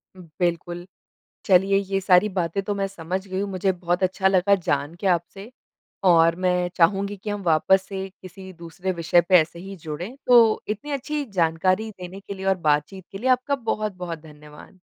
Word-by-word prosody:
बिल्कुल, 175 0 -4 0.6
चलिए 195 0 +4
ये 195 0 -2
सारी 185 +2 +4
बातें 185 -1 -2
तो 205 - -2
मैं 200 -1 -1
समझ 185 +1 -5
गई 190 0 -3
मुझे 190 -1 -1
बहुत 175 0 -2
अच्छा 190 +1 +2
लगा 190 +1 +3
जान 145 -4 -2
के 200 - -3
आपसे 190 +4 -1 0.5
और 165 -2 +5
मैं 180 -1 0
चाहूँगी 195 +4 +2
कि 205 +2 -6
हम 205 -1 -4
वापस 180 +3 +3
से 195 -1 -5
किसी 190 +1 -11
दूसरे 170 +2 -5
विषय 170 0 +3
पे 185 - +7
ऐसे 165 +2 -5
ही 195 +2 -9
जुड़े, 170 - -7
तो 235 -3 +5
इतनी 215 +8 -4
अच्छी 290 +2 -3
जानकारी 185 +1 0
देने 185 -1 -10
के 200 0 -8
लिए 190 0 -7
और 190 0 +3
बातचीत 150 +6 0
के 195 - -6
लिए 255 +5 0
आपका 255 +3 +2
बहुत-बहुत 210 -9 -4
धन्यवाद। 150 +3 -15
190 Hz, 175 wpm, -23 LUFS, 170-200 Hz, 0.6 s, पे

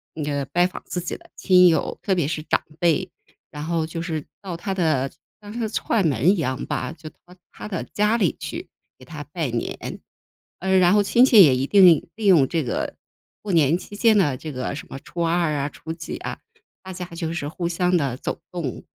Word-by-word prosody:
呃， 155 - -4
那 145 - -2
个 140 -1 -1
拜 175 +6 +2
访 180 - -5
自 180 - -4
己 170 - -4
的 - - -21
亲 180 -2 +5
友， 160 -3 +1
特 195 - +1
别 170 -5 +1
是 155 +1 -2
长 155 - 0 0.2
辈。 175 +2 +2 0.4
然 150 - -7
后 165 -1 0
就 165 +1 -5
是 160 -3 -4 0.2
到 190 -4 -5
他 195 +4 -3
的 155 -8 0 0.3
当 205 0 -10
是 230 -2 -2
串 210 -3 +1
门 140 +2 +2
一 - - +2
样 130 -5 -2
吧， 130 - -3
就 155 0 -9
到 - - -31 0.4
他 - - -8
的 185 -5 -3
家 210 +2 +1
里 185 - +1
去， - - -6 0.3
给 130 - -14
他 145 +2 -8
拜 160 -7 -1
年。 115 0 -4 0.6
呃， 190 +1 +2
然 180 0 +5
后 205 - +5
亲 235 +5 +4
戚 225 -7 +8
也 140 -6 +5
一 130 +1 0
定 180 -5 +6
利 220 -1 -5
用 170 -9 +6
这 165 -2 0
个， 125 - -3 0.5
过 210 - -4
年 160 -1 +4
期 205 - -10
间 220 0 +4
呢， 150 -9 +2
这 155 +4 -7
个 130 +1 -4
什 140 - -8
么 135 - -7
初 170 +4 -7
2 170 -1 +1
啊、 145 0 -1
初 160 +2 -7
几 165 0 -6
啊， - - -6 0.4
大 190 - -8
家 180 0 -5
就 165 -1 -3
是 160 -4 -3
互 170 +3 -3
相 180 +1 +1
地 140 -7 0
走 - - -4
动。 165 -8 -4
170 Hz, 235 characters per minute, -23 LUFS, 150-185 Hz, 0.6 s, 戚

